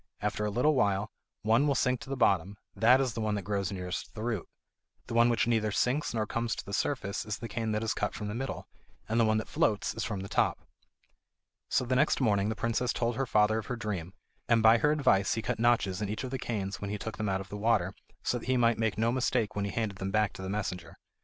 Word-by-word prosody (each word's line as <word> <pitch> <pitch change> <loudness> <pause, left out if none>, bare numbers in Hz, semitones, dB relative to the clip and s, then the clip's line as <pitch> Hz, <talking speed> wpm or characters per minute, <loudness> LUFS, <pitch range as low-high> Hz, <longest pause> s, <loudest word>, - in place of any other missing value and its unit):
After 105 - -1
a - - 0
little 125 +9 +2
while 100 -5 +1 0.3
one 115 +7 +3
will 140 - +2
sink 125 -1 +1
to - - -10
the 135 - -3
bottom; 100 -4 +2 0.2
that 125 +4 +5
is 130 -4 0
the 115 - -3
one 105 -1 0
that 100 - -3
grows 100 -1 -1
nearest 90 -1 -5
the 110 - -5
root. 115 -6 -2 0.6
The - - -7
one 120 +1 +5
which 115 - +2
neither 110 -2 +1
sinks 125 +9 +1
nor 110 -2 -1
comes 115 +1 -2
to - - -7
the 100 - -7
surface 100 -8 -1
is 105 -1 -4
the 115 - -6
cane 110 0 -2
that 105 +1 -1
is 110 - 0
cut - - -2
from 105 - -4
the 105 - -3
middle; 130 +4 -4 0.4
and 115 +2 +1
the 115 - +5
one 110 0 +3
that 110 - -3
floats 105 -2 +1
is 115 - -3
from 105 -4 -3
the 100 - -6
top." - - +1 1.1
So, 125 - +1
the 130 +1 0
next 150 +4 +3
morning, 105 -5 +2
the 110 - -2
princess 115 +2 0
told 120 -1 -1
her 135 +2 -1
father 110 0 +3
of 110 - -8
her 125 - -2
dream, 100 -5 -4 0.3
and 115 -2 +4
by 110 +1 +7
her 150 - +3
advice 120 -10 +3
he 115 - -3
cut - - -2
notches 115 -5 +2
in 105 - -2
each 110 +4 -3
of 130 - -5
the 130 - -3
canes 100 -5 -3
when 100 - -3
he 105 - -2
took 110 +2 -6
them 105 -1 -1
out 95 0 0
of 95 - -10
the - - -6
water, 100 -4 +1 0.3
so 120 - 0
that - - -11
he 130 0 +2
might 115 -1 +3
make 110 -2 0
no 115 +2 +2
mistake 120 -4 0
when 100 0 -1
he 100 - -3
handed 105 -3 -2
them 95 - -2
back 105 0 +1
to - - -9
the 95 - -5
messenger. 90 -4 -4
110 Hz, 265 wpm, -30 LUFS, 100-120 Hz, 1.1 s, by